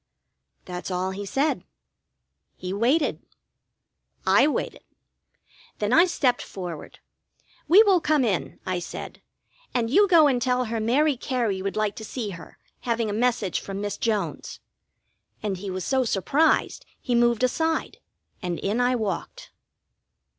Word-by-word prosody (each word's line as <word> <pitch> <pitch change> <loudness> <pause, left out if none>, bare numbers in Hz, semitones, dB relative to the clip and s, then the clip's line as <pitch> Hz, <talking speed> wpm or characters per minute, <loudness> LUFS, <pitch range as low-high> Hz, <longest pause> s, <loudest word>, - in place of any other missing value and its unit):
That's 180 0 -6
all 185 +1 -1
he 200 +1 -6
said. 280 +8 0 0.9
He 185 +1 -5
waited. 255 +10 +1 1.0
I - - +5
waited. 300 - -3 1.0
Then 210 +3 -1
I 340 +5 +7
stepped 270 -8 +1
forward. 175 -5 -7 0.7
"We 390 +7 +8
will 385 -5 +4
come 300 -5 +2
in," 185 -10 -2
I 185 -1 -1
said. 170 - -8 0.5
"And 230 -2 0
you 405 +8 +5
go 335 -5 +6
and 260 -4 +2
tell 250 0 +1
her 225 0 -3
Mary 275 +7 +2
Cary 235 -7 -1
would 195 +1 -3
like 215 -1 0
to 220 - -7
see 220 -1 -4
her, 170 -3 -11 0.2
having 230 -3 -1
a 220 +4 -1
message 225 -7 0
from 195 0 -6
Miss 205 0 -3
Jones." 220 -3 -2 0.8
And 200 -3 -2
he 195 +2 -6
was 185 -1 -4
so 265 -1 +2
surprised 260 - +1 0.2
he 245 - -2
moved 240 0 +3
aside, 320 +5 0 0.4
and 175 -3 -3
in 215 +5 -1
I 250 +1 +2
walked. 225 - -4
230 Hz, 145 wpm, -25 LUFS, 195-265 Hz, 1.0 s, We